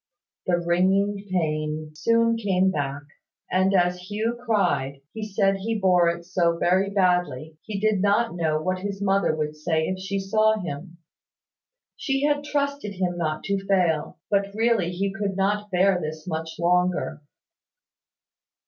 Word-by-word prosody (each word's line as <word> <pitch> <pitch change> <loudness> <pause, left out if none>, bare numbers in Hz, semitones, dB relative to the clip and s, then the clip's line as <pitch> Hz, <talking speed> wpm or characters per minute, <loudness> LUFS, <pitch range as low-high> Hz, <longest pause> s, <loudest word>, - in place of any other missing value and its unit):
The 175 -1 +3
wringing 190 +4 +1
pain 155 -3 -1
soon 230 +8 +2
came 190 -4 +1
back; 145 -3 -3 0.5
and 190 +1 +3
as 180 +1 +1
Hugh 220 +3 -1
cried, 180 - 0
he 220 - -5
said 195 -1 +1
he 220 +3 -2
bore 180 -3 +4
it 170 0 -4
so 170 -2 +1
very 185 +3 +2
badly, 180 -6 0
he 210 -2 -5
did 215 -2 +2
not 205 +4 +2
know 160 -3 0
what 185 +3 -1
his 195 +1 -4
mother 195 -5 +2
would 155 -1 -3
say 160 +1 0
if 185 0 -3
she 195 +1 -3
saw 215 +3 +2
him. 170 0 -7 1.0
She 270 -1 -1
had 290 0 +2
trusted 280 -6 -2
him 180 -2 -1
not 155 -3 -2
to 195 0 -1
fail; 175 -6 +1
but 200 -1 +2
really 225 -5 +2
he 195 +2 -2
could 195 -1 -2
not 205 +2 0
bear 185 -1 +3
this 155 0 -5
much 160 -2 -4
longer. 175 -3 +1
185 Hz, 150 wpm, -24 LUFS, 170-205 Hz, 1.0 s, bore